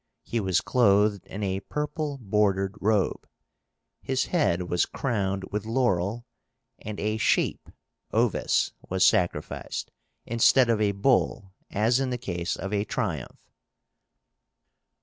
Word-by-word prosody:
He 120 - -2
was 95 -2 +1
clothed 105 -4 +3
in 105 +2 -5
a 95 -1 -1
purple 150 - -3
bordered 100 -4 +1
robe. 105 -2 +1 0.7
His 130 -1 0
head 120 - +1
was 90 0 0
crowned 100 -7 -2
with 105 0 -2
laurel, 115 -2 0 0.5
and 105 -1 -7
a 110 +1 -1
sheep 110 - +1 0.4
(ovis) - - +1 0.2
was 95 0 +3
sacrificed, 90 -1 0 0.3
instead 115 +2 +4
of 110 -2 +1
a 100 -1 +2
bull 100 -3 +1 0.2
as 115 +5 +2
in 135 -1 0
the 125 - -2
case 85 -7 -3
of 95 +2 -5
a 100 -1 +1
triumph. 85 - -4
105 Hz, 125 wpm, -26 LUFS, 95-120 Hz, 0.7 s, instead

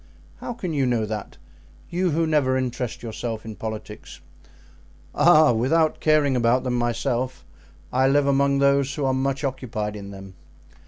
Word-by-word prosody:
"How 245 - -6
can 185 -8 -5
you 135 -3 +1
know 120 -3 +1
that? 105 -1 -6 0.5
You 180 +1 +1
who 165 +1 +1
never 145 -5 +2
interest 125 -2 -3
yourself 115 -1 -5
in 110 -1 -7
politics?" 110 +1 -7 0.9
"Ah! 155 -3 +6
without 155 +8 +1
caring 150 -3 +3
about 120 +1 +2
them 125 -1 -2
myself, 120 -1 -2 0.5
I 130 +1 +3
live 140 +1 +3
among 140 0 +2
those 140 0 +2
who 145 - -2
are 130 - +2
much 135 +1 -1
occupied 115 -6 -3
in 100 -1 -8
them. 95 -1 -10
130 Hz, 155 wpm, -23 LUFS, 115-140 Hz, 0.9 s, Ah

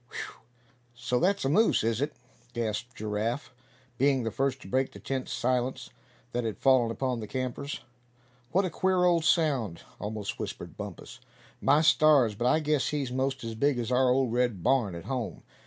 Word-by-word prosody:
"Whew! - - -7 0.5
so 125 +1 -1
that's 200 0 +1
a - - +2
moose, 215 - +3
is 115 +2 0
it?" 145 +1 -1 0.4
gasped 120 +1 -3
Giraffe, 110 +4 -3 0.5
being 135 -1 +3
the 115 - -2
first 135 +1 -1
to - - -11
break 130 +6 0
the - - -10
tense 135 -1 -3
silence 125 +1 -1 0.4
that 120 0 -1
had 110 -4 -3
fallen 130 -3 +4
upon 125 +1 -2
the 110 - -6
campers. 130 +3 -4 0.7
"What 190 +2 +3
a 180 - -2
queer 185 +1 +2
old 170 -2 +3
sound," 135 - +1 0.2
almost 105 -1 -4
whispered - - -6
Bumpus. - - -8 0.4
"My 145 +2 +4
stars! 155 -7 +5
but 120 +4 -1
I 155 +5 +3
guess 150 -2 +1
he's 140 -4 -2
most 135 +1 -1
as 115 0 -4
big 140 +4 +1
as 120 0 -2
our 125 0 +4
old 125 -2 +2
red 120 -7 0
barn 120 -9 +2
at 85 - -8
home. 120 -10 -4
130 Hz, 180 wpm, -28 LUFS, 115-140 Hz, 0.7 s, stars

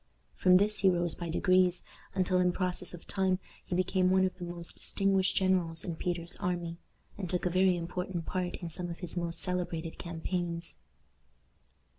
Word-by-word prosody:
From 180 - +6
this 210 +2 +2
he 195 - +5
rose 175 -2 +1
by 170 -1 -5
degrees, 185 +1 +3 0.3
until 185 -1 +2
in 180 -1 +3
process 180 -1 -1
of 170 - -13
time 190 -2 +1 0.3
he 180 - -3
became 185 0 +2
one 190 0 +5
of 185 - -2
the - - -5
most 175 -1 -7
distinguished 195 -1 +1
generals 180 -4 +2
in 170 - -3
Peter's 175 +1 -3
army, 175 -3 -2 0.4
and 185 -3 -3
took 180 0 -1
a 180 - +2
very 185 0 +4
important 175 0 -3
part 180 -1 -2
in 170 -2 -6
some 175 +2 -4
of 170 - -5
his 180 -2 -4
most 170 -1 -1
celebrated 175 -3 -2
campaigns. 170 0 -3
180 Hz, 175 wpm, -31 LUFS, 170-185 Hz, 0.4 s, From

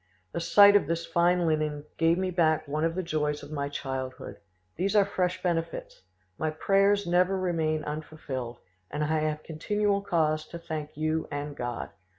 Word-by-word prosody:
The - - -1
sight 200 +4 +7
of 200 - +4
this 170 +1 -1
fine 175 +1 +2
linen 155 -2 0
gave 165 +1 +4
me 185 0 -1
back 160 -3 +2
one 150 +2 -1
of 165 0 +1
the 185 - -1
joys 150 -3 -1
of 145 - -10
my 140 -2 -2
childhood. 130 -2 -5 0.4
These 195 +5 0
are 205 -2 +6
fresh 185 -2 -1
benefits. 165 -2 -2 0.4
My 155 - 0
prayers 195 +5 +2
never 180 +2 +2
remain 160 -4 0
unfulfilled, 145 -5 -5 0.3
and 150 - -2
I 155 +1 +1
have 155 0 -2
continual 200 +5 0
cause 155 -5 0
to 170 - -7
thank 155 -3 -6
you 155 +1 0
and 145 0 -4
God. 120 -3 -4
160 Hz, 170 wpm, -28 LUFS, 150-180 Hz, 0.4 s, sight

